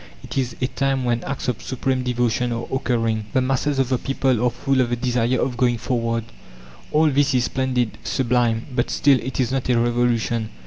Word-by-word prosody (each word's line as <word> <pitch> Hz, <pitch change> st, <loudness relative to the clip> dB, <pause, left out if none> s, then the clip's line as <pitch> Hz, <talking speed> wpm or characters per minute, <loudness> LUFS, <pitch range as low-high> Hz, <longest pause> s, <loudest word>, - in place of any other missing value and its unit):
It -, -, -8 dB
is 125 Hz, -3 st, -1 dB
a 125 Hz, -, +1 dB
time 135 Hz, 0 st, -1 dB
when 120 Hz, -1 st, 0 dB
acts 135 Hz, -, -4 dB
of 125 Hz, -4 st, -1 dB
supreme 130 Hz, 0 st, -1 dB
devotion 125 Hz, -1 st, 0 dB
are 115 Hz, 0 st, -3 dB
occurring. 115 Hz, -4 st, 0 dB
The 130 Hz, -, +3 dB
masses 135 Hz, +2 st, 0 dB
of 135 Hz, -2 st, +1 dB
the 130 Hz, -2 st, +1 dB
people 130 Hz, -3 st, 0 dB
are 125 Hz, -, +4 dB
full 130 Hz, +2 st, 0 dB
of 120 Hz, -, 0 dB
the 120 Hz, -, 0 dB
desire 120 Hz, 0 st, 0 dB
of 125 Hz, -2 st, -1 dB
going 120 Hz, -1 st, +2 dB
forward. 115 Hz, -1 st, -1 dB, 0.7 s
All 155 Hz, 0 st, +4 dB
this 140 Hz, 0 st, +2 dB
is 125 Hz, -, +3 dB
splendid, 125 Hz, -3 st, -1 dB
sublime; 115 Hz, +1 st, +1 dB
but 120 Hz, -, 0 dB
still, 140 Hz, -2 st, +4 dB
it 130 Hz, +2 st, -5 dB
is 130 Hz, -1 st, +1 dB
not 130 Hz, -1 st, -1 dB
a 125 Hz, -, +3 dB
revolution. 120 Hz, -1 st, +1 dB
125 Hz, 205 wpm, -22 LUFS, 120-130 Hz, 0.7 s, are